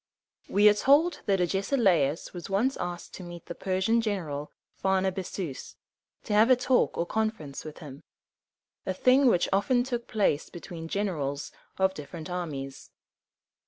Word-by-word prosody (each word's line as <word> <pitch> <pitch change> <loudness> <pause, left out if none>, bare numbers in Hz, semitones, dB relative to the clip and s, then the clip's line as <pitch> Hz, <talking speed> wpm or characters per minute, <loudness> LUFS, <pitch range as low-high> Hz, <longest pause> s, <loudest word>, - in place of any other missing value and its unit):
We 205 +2 +5
are 210 - +8
told 295 +9 +3
that 195 -2 +3
Agesilaus 180 - +1
was 175 0 -7
once 225 +8 +1
asked 175 0 -5
to 185 - -8
meet 175 -1 -9
the - - -6
Persian 190 +6 +1
general 165 -10 -3 0.2
Phar 190 0 +1
na 190 0 +1
ba´zus, 180 -5 -6 0.5
to - - -3
have 215 +3 +5
a 255 - +8
talk 250 +1 +1
or 170 - 0
conference 215 -9 -3
with 155 -1 -9
him, 140 -1 -10 0.8
a 190 - -3
thing 255 +6 +5
which 180 -8 +3
often 245 +5 +3
took 240 -2 -4
place 195 -9 +1
between 170 -1 -8
generals 155 -8 -2 0.3
of 190 0 +2
different 160 +2 -8
armies. 140 -6 -5
190 Hz, 155 wpm, -28 LUFS, 165-220 Hz, 0.8 s, are